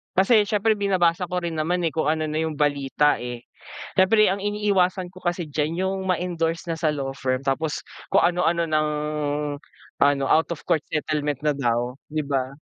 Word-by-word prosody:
Kasi 205 +2 +4
siyempre 215 0 +1
binabasa 180 -3 +2
ko 180 0 -3
rin 165 -2 -3
naman, 175 +3 0
eh, 165 - +1
kung 160 -2 -1
ano 155 +1 +1
na 155 0 -2
yung 160 -1 -2
balita, 145 0 +1
eh. 120 0 -6 0.5
Siyempre 210 +3 +5
ang 195 +1 0
iniiwasan 200 -3 +1
ko 185 - -13
kasi 175 -1 -1
diyan, 155 +5 -1
yung 195 0 -1
ma-endorse 170 -2 -1
na 165 - -1
sa 160 -1 0
law 135 -2 -3
firm, 130 0 -2
tapos 150 +3 0 0.3
kung - - +4
anu-ano 170 -1 +1
nang, 155 -1 +1 1.1
ano, 140 -1 +4
out 160 +5 +3
of 170 - -5
court 155 - +2
settlement 150 -2 -1
na 150 - +3
daw, 120 -2 0 0.2
'di 155 -1 -2
ba? 135 -2 -1
160 Hz, 180 wpm, -24 LUFS, 145-180 Hz, 1.1 s, Siyempre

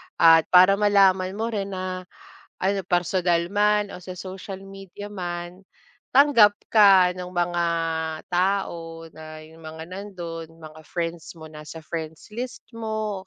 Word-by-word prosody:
At 165 -1 +6
para 185 +2 +6
malaman 195 -2 +3
mo 225 +2 -2
rin 200 -2 -3
na, 185 0 -5 0.6
ano 195 +1 +1
personal 175 -1 +1
man 210 0 +2
o 180 - -8
sa 180 0 -9
social 190 +1 -8
media 195 +1 -10
man, 175 -1 -6 0.5
tanggap 255 -7 +6 0.2
ka 195 -4 +6
ng 180 - -5
mga 175 0 0 0.7
tao 170 -3 -2
na, 155 0 -11
yung 160 +1 -14
mga 160 0 -8
nandun, 175 -4 -7 0.2
mga 155 0 -11
friends 170 -1 -5
mo, 160 -1 -12
nasa 155 +1 -10
friends 160 +1 -7
list 245 +4 -6
mo, 215 -4 -4
185 Hz, 135 wpm, -24 LUFS, 170-200 Hz, 0.7 s, At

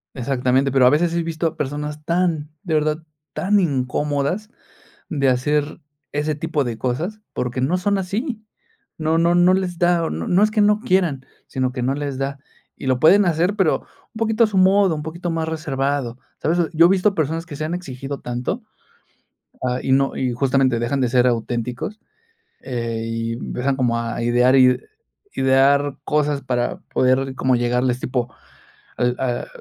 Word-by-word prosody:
Exactamente. 130 +1 +1
Pero, 130 -2 +5
a - - +8
veces, 165 +4 +2
he 170 - +1
visto 165 0 -3
a 160 - -5
personas 150 +2 -4
tan, 170 -3 0
de 175 -5 -3
verdad, 155 +1 0 0.3
tan 205 +2 +2
incómodas 145 - -1 0.6
de 140 -4 +1
hacer 145 +5 0 0.3
ese 150 +1 -1
tipo 155 -1 -1
de 115 -2 -3
cosas, 170 - -3
porque 125 +1 -2
no 165 +8 +1
son 200 +2 +1
así. 215 - -3 0.6
No 160 +1 +1
no 170 +1 +3
no 175 +1 +5
les 185 -2 -1
da 175 -1 +2
o - - -2
no 80 +2 -4
no 185 +4 +4
es 215 - +4
que 215 - 0
no 210 +1 +4
quieran, 180 -10 +1 0.2
sino 130 -1 -1
que 125 -1 -4
no 135 +2 +1
les 140 -2 -4
da, 140 +1 -3 0.4
y 135 - -7
lo 130 -1 +2
pueden 195 +7 +6
hacer, 175 +4 +1
pero 190 -6 +2
un 220 - -18
poquito 225 +1 +2
a - - -1
su 205 -2 -2
modo, 190 -2 +4
un 150 - -5
poquito 170 +3 -5
más 165 -1 -2
reservado, 140 -5 -2 0.2
¿sabes? 165 +3 +1 0.2
Yo 165 +2 +6
he - - +1
visto 195 +2 +3
personas 160 +2 -1
que 150 -5 -8
se 155 - -4
han 170 - -2
exigido 140 -5 -6
tanto, 125 - -3 1.0
ah, 125 0 0
y 130 - +1
no 135 0 +2
y 125 -2 -1
justamente, 130 -1 +2
dejan 120 +4 -1
de 125 - +2
ser 125 0 +3
auténticos, 120 - -2 0.6
eh, 115 -3 -3
y 115 0 -3
empiezan 130 +2 -2
como 120 -3 +1
a 115 0 -3
idear 120 +2 +3
id 125 -1 +5 0.6
idear 135 +1 +3
cosas 150 -1 0
para 125 -2 -1 0.2
poder 130 +1 +2
como 130 -1 +2
llegarles, 125 +1 +1
tipo: 125 -2 -2 0.6
"Al 125 0 +1
ah, 125 -2 -2
145 Hz, 180 wpm, -21 LUFS, 125-170 Hz, 1.0 s, a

